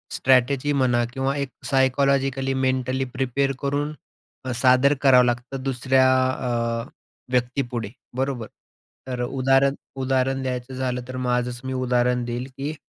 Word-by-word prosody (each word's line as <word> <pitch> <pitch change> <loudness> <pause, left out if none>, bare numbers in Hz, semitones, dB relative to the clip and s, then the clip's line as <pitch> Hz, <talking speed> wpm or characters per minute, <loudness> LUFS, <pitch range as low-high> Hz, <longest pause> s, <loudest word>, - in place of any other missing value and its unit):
Strategy 130 +2 +2
म्हणा 125 -3 +2
किंवा 135 +1 -1
एक 140 -2 -2 0.2
सायकॉलॉजिकली, 135 0 +1
मेंटली 130 0 0
प्रिपेअर 135 +1 0
करून 145 +2 -1 0.5
अ, 130 - -2
सादर 130 +3 +4
करावं 130 -3 +6
लागतं 125 +2 -2
दुसऱ्या 130 0 +2 0.3
अ, 115 -2 -2 0.5
व्यक्तीपुढे, 125 -2 -1 0.3
बरोबर. 130 -4 -2 0.6
तर 125 -1 -3
उदाहरण 135 +2 +2 0.3
उदाहरण 130 0 +1
द्यायचं 125 0 -4
झालं, 130 -1 -2
तर 130 0 -6
माझंच 125 -1 -1
मी 130 - -3
उदाहरण 125 -1 +1
देईन 120 +1 -3
की 145 +3 -3
130 Hz, 125 wpm, -23 LUFS, 125-135 Hz, 0.6 s, करावं